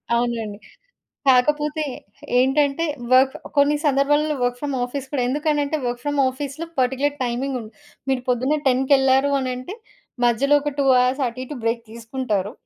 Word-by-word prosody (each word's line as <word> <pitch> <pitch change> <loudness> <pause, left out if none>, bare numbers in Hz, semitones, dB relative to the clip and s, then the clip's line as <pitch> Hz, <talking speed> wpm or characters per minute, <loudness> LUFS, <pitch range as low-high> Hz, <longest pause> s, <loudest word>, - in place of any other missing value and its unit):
అవునండి. 235 -3 -2 0.7
కాకపోతే 295 +4 +2 0.6
ఏంటంటే 280 +4 +2 0.3
వర్క్ 260 +1 +5 0.2
కొన్ని 285 +1 +4
సందర్భాలలో 295 +2 +2
వర్క్ 245 0 0
ఫ్రం 285 -2 -2
ఆఫీస్ 265 +1 -6
కూడా, 275 - 0
ఎందుకనంటే 295 +1 0
వర్క్ 240 0 -3
ఫ్రం 290 0 -2
ఆఫీస్‌లో 280 +4 -6
పర్టిక్యులర్ 265 +3 0
టైమింగ్ 255 +2 -2
ఉం - - -9 0.4
మీరు 265 -1 +1
పొద్దున్నే 255 +4 +1
10 260 0 +3
కెళ్లారు 270 0 +4
అనంటే 255 +7 -4 0.5
మధ్యలో 270 +5 +3
ఒక 295 -1 -3
2 275 - +2 0.2
అవర్స్ 255 +2 +1
అటు 240 +2 -7
ఇటు 295 - -7
బ్రేక్ 230 +1 0
తీసుకుంటారు. 225 -3 -3
265 Hz, 140 wpm, -22 LUFS, 250-290 Hz, 0.7 s, వర్క్